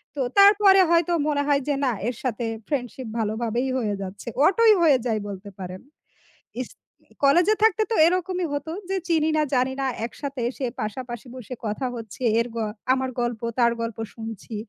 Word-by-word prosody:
তো - - -6 0.2
তারপরে 400 -1 +7
হয়তো 340 0 +3
মনে 290 -1 +1
হয় 285 -1 +3
যে 290 - +1
না 255 - +2 0.2
এর 245 - -2
সাথে 240 -2 -2 0.2
ফ্রেন্ডশিপ 255 -3 -3
ভালো 215 -1 0
ভাবেই 240 +3 -1
হয়ে 210 -4 -1
যাচ্ছে, 195 +3 -8 0.2
অটোই 440 +5 +6
হয়ে 300 -5 +5
যায় 220 -2 0
বলতে 200 0 -7
পারেন। 185 0 -7 0.8
ইস - - -6 0.5
কলেজে 350 +10 +5
থাকতে 440 -1 +4
তো - - +2
এরকমই 365 +1 0
হতো 285 +3 -3 0.2
যে 385 - 0
চিনি 320 -2 +2
না 305 - +3
জানি 255 +1 +2
না, - - 0 0.2
একসাথে 275 +1 -6
এসে 265 0 -4 0.2
পাশাপাশি 240 +2 -5
বসে 250 0 -8
কথা 215 +5 -2
হচ্ছে। 225 +1 -9 0.2
এর 230 - 0
গ - - -4 0.4
আমার 260 0 -1
গল্প 240 -2 -2 0.2
তার 235 -1 +5
গল্প 230 -1 -4 0.2
শুনছি। 225 -1 -7
260 Hz, 175 wpm, -24 LUFS, 230-330 Hz, 0.8 s, তারপরে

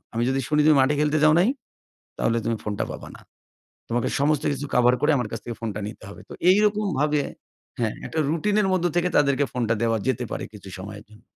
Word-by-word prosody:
আমি 115 - 0
যদি 135 0 +1
শুনি 150 0 +2
তুমি 155 -2 +6
মাঠে 140 +3 +3
খেলতে 150 +1 +2
যাও 155 0 +6
নাই, 200 - +3 0.7
তাহলে 115 +1 +1
তুমি 115 0 0
ফোনটা 105 -1 -2
পাবা - - -8
না। - - -13 0.7
তোমাকে 120 0 0
সমস্ত 145 0 +2
কিছু 145 +1 -4
কাভার 125 0 +4
করে, 150 - +3
আমার 125 -4 -2
কাছ 115 - -4
থেকে 120 -2 -5
ফোনটা 105 -2 -3
নিতে 110 - -10
হবে।" - - -11
তো - - -8 0.2
এইরকমভাবে 190 -8 +2 0.6
হ্যাঁ, 110 -2 0
একটা 160 - -3
রুটিন 185 +6 0
এর 195 - +1
মধ্য 175 -1 +1
থেকে 175 +1 +2
তাদেরকে 140 -1 +3
ফোনটা 115 -3 0
দেওয়া 115 -1 +2
যেতে 125 -1 0
পারে, - - -3
কিছু 100 -2 -11
সময়ের 105 +2 -8
জন্য। 110 +1 -18
135 Hz, 210 wpm, -24 LUFS, 115-155 Hz, 0.7 s, তুমি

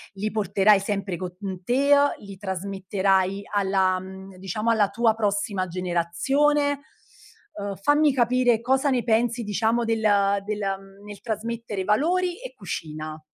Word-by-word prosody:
li 205 +2 -2
porterai 205 -1 +3
sempre 195 -2 -3
con, 180 -1 -6
mhmm, 190 -3 -6
te, 275 +6 +3
uhm, 285 0 +3
li 200 -1 -10
trasmetterai 190 0 -1
alla, 190 -2 +2
mhmm, 190 0 -10
diciamo, 195 +4 -2
alla 215 -3 +3
tua 225 +1 +2
prossima 205 -3 -1
generazione? 270 - +1 0.7
Uhm, 200 -1 -5
fammi 290 +5 +3
capire 245 -2 +3
cosa 265 +4 +2
ne 245 -2 +1
pensi, 235 +1 +1
diciamo, 220 +3 0
del 225 -1 0 0.4
del 210 0 -3 0.5
nel 205 -1 -10
trasmettere 225 -2 -4
valori 350 - +1
e - - -8
cucina. 155 0 -6
205 Hz, 135 wpm, -24 LUFS, 190-240 Hz, 0.7 s, porterai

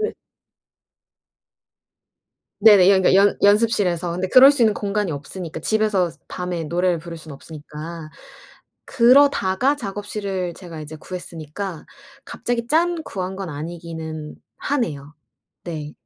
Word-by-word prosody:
네. 430 - -1 2.5
네네. 200 -3 +7
연 190 -1 +4
그러니까 185 - +4
연 205 - +2
연습실에서. 205 -5 +2
근데 180 +2 -2
그럴 260 +5 +8
수 280 -4 +1
있는 215 -2 +4
공간이 205 -3 -2
없으니까, 160 +3 -7
집에서 210 -3 +1 0.2
밤에 180 -2 -4
노래를 175 +2 0
부를 170 +1 -9
수는 160 -2 -10
없으니까. 155 +2 -9 0.7
그러다가 260 -1 +4
작업실을 200 -5 -4
제가 170 -3 -10
이제 155 +1 -8
구했으니까 170 +1 -7 0.4
갑자기 235 -1 -3
짠 335 +2 +1
구한 190 0 -5
건 190 -3 -5
아니기는 160 0 -7 0.2
하네요. 150 - -3 0.5
네. 155 -4 -6
180 Hz, 285 characters per minute, -21 LUFS, 160-210 Hz, 2.5 s, 그럴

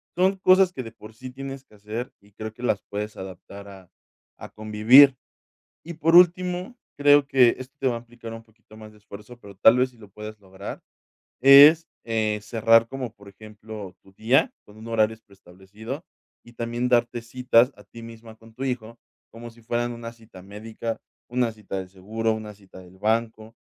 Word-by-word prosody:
Son 190 +2 +2
cosas 185 0 +4
que 130 - -6
de 115 - -10
por 110 -1 -14
sí 130 +4 -10
tienes 135 +1 -8
que 110 - -22
hacer 105 +4 -6
y 100 +1 -24
creo 110 +1 -7
que 120 - -13
las 105 -5 0
puedes 105 +1 -5
adaptar 95 +2 -10
a 95 -3 -14 0.5
a - - -10
convivir. 110 +6 +5 0.7
Y 170 - -8
por 165 +1 +1
último, 180 +5 +3 0.2
creo 145 0 +5
que 130 -4 +4
esto 130 +2 -10
te 135 - +1
va 120 - -2
a - - -4
implicar 120 -1 -11
un 115 - -10
poquito 110 -1 -21
más 110 -1 -12
de 105 - -20
esfuerzo, 105 +3 -13
pero 100 -3 -14
tal 110 +5 +5
vez 130 +1 +2
si 125 - -24
lo 105 -3 -16
puedes 105 +2 -10
lograr, 95 0 -10 0.6
es 145 +5 +8 0.2
eh, 110 -2 -1
cerrar 115 +1 +3
como, 130 -2 -6
por 100 -3 -16
ejemplo, 105 -2 -11
tu 95 - -21
día 115 +7 +1
con 105 - -17
un 110 +1 -12
horario 110 -1 +1
preestablecido 100 - -11 0.4
y 120 - -16
también 120 +1 -3
darte 120 -1 +1
citas 125 +1 +2
a 105 - -17
ti 115 +4 -13
misma 115 -1 -12
con 115 0 -19
tu 130 +3 -5
hijo, 120 -3 -5 0.3
como 115 +1 -10
si 115 0 -20
fueran 120 +1 -2
una 115 0 -8
cita 110 -5 -16
médica, 110 +3 -7 0.3
una 125 -1 -1
cita 105 -3 -7
del 95 -1 -7
seguro, 110 +4 -3
una 110 -1 -8
cita 95 -2 -16
del 90 +1 -17
banco, 110 +1 -2
115 Hz, 195 wpm, -24 LUFS, 105-125 Hz, 0.7 s, es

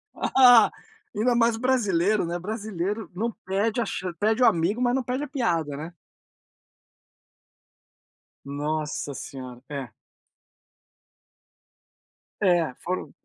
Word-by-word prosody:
Ah, 245 -3 +6 0.4
ainda 240 +3 +2
mais 230 -1 +3
brasileiro, 215 -7 +2
né, 175 +1 -3
brasileiro 210 0 -4
não 230 +4 -1
perde 210 +5 0
a - - 0
chan 185 -2 -4
perde 220 +4 +1
o - - +7
amigo 185 +8 +2
mas 245 +1 +2
não 265 - 0
pede 255 +4 -2
a - - -4
piada, 170 - -1
né. 160 +4 -7 2.5
Nossa 150 +1 -3
senhora. 130 -2 -8
É. 140 -4 -5 2.5
É, 175 -8 +3
foram 185 +1 -3
200 Hz, 110 wpm, -25 LUFS, 165-235 Hz, 2.5 s, o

